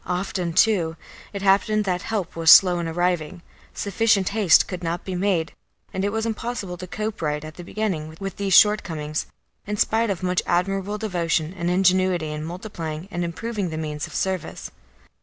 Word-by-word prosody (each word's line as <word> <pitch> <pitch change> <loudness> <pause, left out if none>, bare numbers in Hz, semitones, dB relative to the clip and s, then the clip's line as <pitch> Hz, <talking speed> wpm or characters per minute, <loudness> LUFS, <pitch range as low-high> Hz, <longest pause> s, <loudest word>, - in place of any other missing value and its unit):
Often, 180 -1 -2
too, 170 -6 +3 0.4
it 200 -1 -6
happened 205 +2 +3
that 180 -2 -1
help 210 -6 -3
was 165 -1 +2
slow 180 0 +8
in 170 - -2
arriving; 175 0 -1 0.3
sufficient 200 -1 +1
haste 205 -4 +4
could 180 -2 -6
not 170 +1 -3
be 190 - -4
made, 180 -3 0 0.4
and 190 - -2
it 200 - 0
was 225 +1 -1
impossible 225 -4 -4
to 185 +1 -8
cope 215 +2 -4
right 150 -1 -1
at 155 - -8
the 175 - -10
beginning 170 -6 -3
with 195 0 -5
these 195 -2 +1
shortcomings, 160 -8 +3 0.4
in 210 0 -2
spite 225 +2 +2
of 190 -2 -3
much 180 0 +1
admirable 195 +3 0
devotion 170 -5 -1
and 175 -1 -2
ingenuity 185 -3 +2
in 150 0 -5
multiplying 170 -1 -6
and 175 0 -2
improving 200 +3 -3
the 160 - -5
means 150 -1 -4
of - - -11
service. 190 -3 -3
180 Hz, 175 wpm, -23 LUFS, 165-200 Hz, 0.4 s, slow